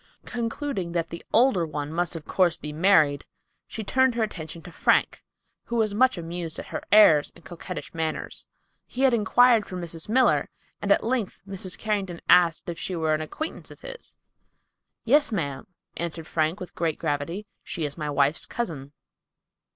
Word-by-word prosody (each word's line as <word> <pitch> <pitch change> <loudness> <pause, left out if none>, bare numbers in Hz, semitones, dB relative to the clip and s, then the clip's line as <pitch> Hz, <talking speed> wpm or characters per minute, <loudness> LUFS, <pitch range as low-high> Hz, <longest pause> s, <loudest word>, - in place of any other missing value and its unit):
Concluding 230 - -3
that 170 -1 -1
the 170 - -7
older 230 -6 +4
one 150 -1 -4
must 175 0 -1
of 160 -3 -7
course 180 -3 +2
be 150 0 -7
married, 155 -4 +4 0.4
she 220 - -6
turned 260 +3 +2
her 235 - +1
attention 170 -5 -6
to 175 - -10
Frank, - - +2 0.4
who 235 - -4
was 220 -3 +1
much 255 +1 +3
amused 170 -1 -5
at - - -8
her - - -4
airs 160 -9 +7
and 170 - -17
coquettish 180 +1 -7
manners. 160 -1 -3 0.4
He 260 - -3
had 265 -2 +5
inquired 235 0 +4
for 185 - -6
Mrs. 170 0 -6
Miller, 255 +3 +3 0.3
and - - 0
at - - +4
length 230 -6 -2
Mrs. 190 -2 -4
Carrington 195 -5 -2
asked 175 -2 +5
if 170 -1 -5
she 185 - -3
were 160 -2 +1
an 155 - 0
acquaintance 310 - -6
of - - -14
his. - - -9 0.9
"Yes, 290 +3 +4
ma'am," 145 -10 -3 0.3
answered 170 -1 -4
Frank 160 +5 0
with 185 - -8
great 165 -2 -1
gravity, 165 +6 -2 0.2
"she 165 - -3
is 145 - -4
my 150 -3 -4
wife's 145 +2 +1
cousin." 150 - -5
175 Hz, 175 wpm, -26 LUFS, 160-220 Hz, 0.9 s, airs